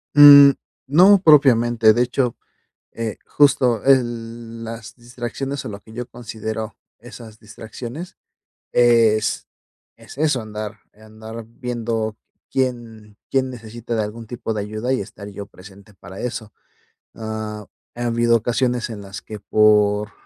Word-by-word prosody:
Mm, 145 -1 +10 0.4
no 185 +8 +6
propiamente. 120 - +5
De 120 - +1
hecho, 125 -1 0 0.6
eh, 115 -3 -4
justo 130 -6 +3
el 115 -3 0
las 115 -1 -8
distracciones, 125 +3 -6
o - - -5
lo 100 -1 -8
que 110 - -17
yo 120 +1 -6
considero 110 -2 -6 0.2
esas 115 -2 -12
distracciones, 120 - -9 0.6
es 115 -3 +3 0.5
es - - -14
eso, 150 -4 +1
andar 110 0 -7
andar 110 +1 -11
viendo 115 -2 -4 0.3
quién 115 -5 -3
quién 130 -1 0
necesita 115 -1 -6
de 110 - +1
algún 110 +2 -8
tipo 115 -1 -5
de 105 - -2
ayuda, 110 +5 -3
y 130 - 0
estar 100 - -9
yo 100 0 -8
presente 100 +1 -16
para 95 +1 -11
eso. 110 -3 -5 0.6
Ah, 110 -1 -6 0.3
ha 120 0 -4
habido 115 0 +2
ocasiones 120 +1 -1
en 110 -2 -7
las 100 0 -9
que, 110 - -9
por 105 0 +2
115 Hz, 135 wpm, -21 LUFS, 110-125 Hz, 0.6 s, Mm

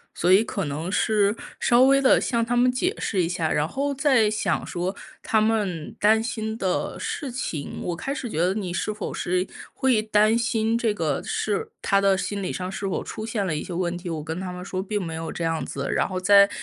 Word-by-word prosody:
所 180 +2 +3
以 200 +4 +6
可 200 -6 -3
能 150 +5 -4
是 205 0 +2 0.3
稍 240 +1 +5
微 275 +1 +5
地 265 - +5
向 235 -1 0
他 240 +1 0
们 250 +1 +5
解 310 - 0
释 190 - 0
一 165 - -1
下， 165 -3 -1
然 150 - +2
后 280 +7 -2
再 260 -6 +3
想 215 - -1
说 180 +2 -2 0.3
他 220 - +2
们 210 -7 0
担 220 +2 +4
心 220 -1 -3
的 190 -4 -1
事 280 -5 -4
情， 165 - -4
我 175 - -2
开 270 +11 -3
始 250 -5 -5
觉 160 - -5
得 180 +3 +3
你 190 -4 -3
是 215 - -1
否 210 - -5
是 180 +1 -1 0.3
会 260 -5 +2
担 215 +1 +3
心 230 -1 +1
这 230 -3 +1
个 155 -8 -1
是 205 -2 -2
他 200 0 +2
的 195 -1 +4
心 200 0 -3
理 - - -2
上 185 0 -4
是 195 +1 -5
否 - - -1
出 220 - -6
现 215 -4 -2
了 155 - -1
一 - - -3
些 - - -8
问 175 0 -1
题， 175 0 -6
我 160 -2 -3
跟 160 +2 -5
他 185 -1 -4
们 180 0 -7
说 185 -1 -3
并 205 +1 -2
没 165 -3 -4
有 165 0 -4
这 170 - -3
样 165 -1 -1
子， 140 0 -4
然 - - +1
后 185 0 -3
再 200 +2 +6
200 Hz, 255 characters per minute, -24 LUFS, 180-225 Hz, 0.3 s, 以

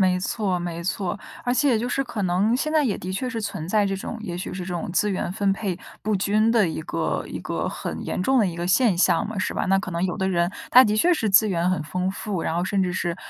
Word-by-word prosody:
没 185 -1 +3
错 190 -2 -1
没 170 -1 -4
错。 190 +1 -2 0.3
而 245 - +1
且 260 -3 +3
就 240 +3 -2
是 270 +2 0
可 220 -4 -4
能 190 +6 +2
现 305 +3 -2
在 310 -2 +3
也 215 - 0
的 185 +1 -5
确 250 +7 -2
是 230 -3 -3
存 175 -5 -4
在 210 0 +3
这 195 -1 -1
种， 210 - -5
也 175 -5 -5
许 180 - -5
是 185 - -5
这 180 - -5
种 190 +4 -3
资 210 +3 +2
源 185 -1 -2
分 200 -1 +1
配 195 -3 -3 0.3
不 215 +1 0
均 210 +3 +2
的 215 -7 +3
一 160 - -4
个 - - -2
一 - - -6
个 - - -3
很 - - -5
严 - - -2
重 265 +6 +3
的 210 - +4
一 170 - -3
个 175 - -3
现 205 -1 +3
象 170 0 +3
嘛， 220 - -6
是 205 - -1
吧？ - - -1
那 195 +1 +3
可 195 - -4
能 170 +2 -1
有 180 - -2
的 190 -2 0
人 175 -1 +1 0.2
他 255 +1 +9
的 210 0 +1
确 355 +10 +4
是 225 -10 0
资 210 +2 +5
源 175 -1 +1
很 185 -5 0
丰 180 +5 -2
富， 200 -4 -4
然 160 - -1
后 175 - 0
甚 195 +1 0
至 180 -1 0
是 175 -1 -2
195 Hz, 300 characters per minute, -24 LUFS, 180-220 Hz, 0.3 s, 他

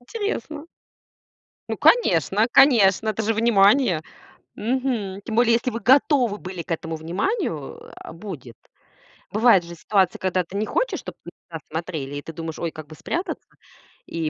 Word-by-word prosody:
Интересно. 315 - -5 1.0
Ну, - - -2
конечно, 225 - +3
конечно! 220 -7 +5
Это 215 +1 -3
же 220 +1 +1
внимание. 215 - +3 0.5
Мгм. 230 -5 -2
Тем 220 - -4
более, 235 0 +4
если 235 +2 +1
вы 230 -1 -5
готовы 255 -2 +3
были 185 -3 -7
к 170 - -10
этому 165 0 -3
вниманию, 170 - -3 0.3
э,- - - -7
будет. 165 - -9 0.8
Бывает 215 -4 +4
же 170 0 -10
ситуация, 190 +1 +1
когда 185 -1 0
ты 180 +3 -12
не 210 +2 -1
хочешь, - - -1
чтоб - - -9
на - - -8 0.2
тебя 165 -1 -6
смотрели. 160 -4 -4
И 145 - -4
ты 165 - -9
думаешь: 160 0 -6
"Ой, 170 - -2
как 155 -1 -10
бы 155 - -12
спрятаться". 335 - -4 0.6
И 165 -2 -3
200 Hz, 160 wpm, -23 LUFS, 165-245 Hz, 1.0 s, конечно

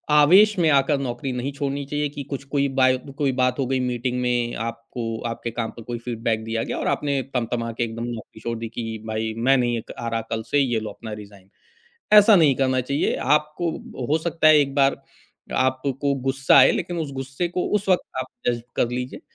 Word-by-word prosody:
आवेश 190 +8 +6
में 165 -2 +4
आकर 135 +1 +3
नौकरी 120 +2 -3
नहीं 125 +3 -3
छोड़नी 140 0 -2
चाहिए 150 0 -1
कि 145 - -4
कुछ 140 0 -4
कोई 140 -1 +2
बाय 130 0 +5 0.2
कोई 140 -2 +3
बात 125 +2 +2
हो 135 - +1
गई 130 0 0
मीटिंग 125 +1 -2
में 120 -1 0
आपको 115 0 -6 0.2
आपके 115 0 -5
काम 115 -1 -2
पर 115 - -8
कोई 120 - -2
फ़ीडबैक 115 -2 -1
दिया 115 0 -2
गया - - -2
और - - -2
आपने 140 -2 -1 0.2
तम-तमा 115 0 -2
के - - +1
एकदम 115 0 -4
नौकरी 110 -2 -8
छोड़ 115 0 -3
दी 115 0 -5
कि 120 - -2 0.2
भाई, 110 0 -2
मैं 135 +4 +3
नहीं 120 -1 +1
एक 115 - -8 0.2
आरा 115 -1 -1
कल 110 -1 -2
से, 145 - +4
ये 120 -5 +1
लो 110 -1 -5
अपना 110 +1 -8
रिज़ाइन, 100 -2 -16 0.7
ऐसा 210 0 +7
नहीं 140 -3 +5
करना 130 -1 +2
चाहिए 140 - +1 0.2
आपको। 150 +3 -2 0.4
हो 155 - +3
सकता 165 -2 +3
है 155 - +7
एक 140 -1 -1
बार 135 -1 +2 0.7
आपको 135 +2 -1
गुस्सा 135 +1 +3
आए 130 - +8
लेकिन 175 -1 -3
उस 150 -4 -3
गुस्से 135 +6 -3
को 180 - +1
उस 200 - -11
वक़्त 185 -2 +4 0.2
आप - - -4 0.2
डाइजेस्ट 120 -1 -1
कर 120 - +2
लीजिए 125 - -6
130 Hz, 210 wpm, -23 LUFS, 115-140 Hz, 0.7 s, आए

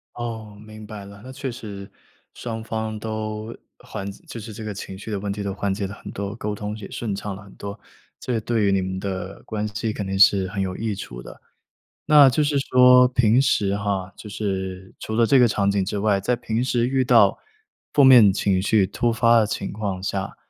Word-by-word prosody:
哦， 110 -3 -6
明 110 0 -11
白 105 -2 -8
了， 100 0 -12
那 130 - -8
确 135 0 -5
实， 105 -5 -9 0.4
双 115 -2 -6
方 110 -1 -4
都 110 0 -5 0.3
缓 100 - -6
解 100 - -12
就 115 - -8
是 110 0 -8
这 110 +2 -8
个 105 -1 -4
情 95 -1 -8
绪 105 +3 -8
的 100 - -2
问 100 0 -3
题 100 +1 -4
都 100 -1 -3
缓 100 0 -1
解 100 0 -3
了 100 - -6
很 - - -11
多， 100 0 -4
沟 105 -2 -3
通 105 0 -5
也 105 -2 -9
顺 110 -4 -4
畅 100 0 -5
了 100 - -11
很 100 - -16
多， 100 +1 -7 0.4
这 120 -3 -2
对 110 0 0
于 100 - +3
你 95 -1 +2
们 95 0 -4
的 95 0 -5
关 105 -1 -3
系 105 +2 -3
肯 105 -2 -5
定 95 0 -2
是 95 -1 +5
很 100 +1 -4
有 95 -1 -2
益 110 -2 -2
处 - - -8
的。 - - -12 0.7
那 150 -2 +8
就 135 +4 +1
是 145 -1 +1
说 125 -1 +6
平 125 -1 +3
时 100 -7 +1
哈， 100 -2 -2
就 105 - -10
是 95 -2 -4
除 110 - -5
了 115 +1 +4
这 135 +4 +4
个 125 - +6
场 100 -3 +1
景 100 -1 +1
之 100 +2 -3
外， 100 -1 +2
在 120 +6 0
平 115 0 -2
时 120 -2 +1
遇 130 0 +1
到 125 - +5 0.6
负 145 - +5
面 125 -7 +8
情 95 -1 +1
绪 100 +1 +3
突 115 +5 0
发 115 +1 +4
的 110 - +3
情 100 -1 -4
况 100 -3 -4
下， 100 0 -3
105 Hz, 245 characters per minute, -23 LUFS, 100-115 Hz, 0.7 s, 那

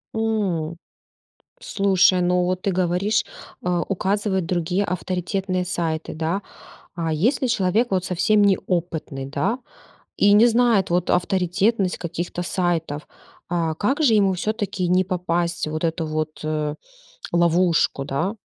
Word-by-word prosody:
М. 190 -8 -1 0.9
Слушай, 190 -2 +3
ну 180 0 +2
вот 185 0 -1
ты 200 - 0
говоришь, 185 +4 +1 0.4
э, - - -1 0.2
указывает 195 -1 0
другие 180 +2 0
авторитетные 185 +1 -2
сайты, 165 -3 -2
да? 165 +5 -2 0.5
А 165 -2 -2
если 240 - +1
человек 225 +1 +1
вот 185 -1 0
совсем 205 +4 +2
неопытный, 170 -8 -1
да? 145 - -1 0.6
И 205 0 +5
не 225 +3 +7
знает 230 -5 +3
вот 175 0 +1
авторитетность 190 +2 +1
каких-то 175 +1 -4
сайтов, 170 -5 -2 0.4
а, 165 -2 0
как 270 - 0
же 235 -7 +4
ему 195 -3 +3
всё-таки 200 -1 -2
не 185 +1 +3
попасть 175 -2 -1
в 155 - -4
эту 165 0 -1
вот 155 0 -4 0.9
ловушку, 170 -4 +2
да? 150 +10 -2
180 Hz, 125 wpm, -22 LUFS, 170-200 Hz, 0.9 s, не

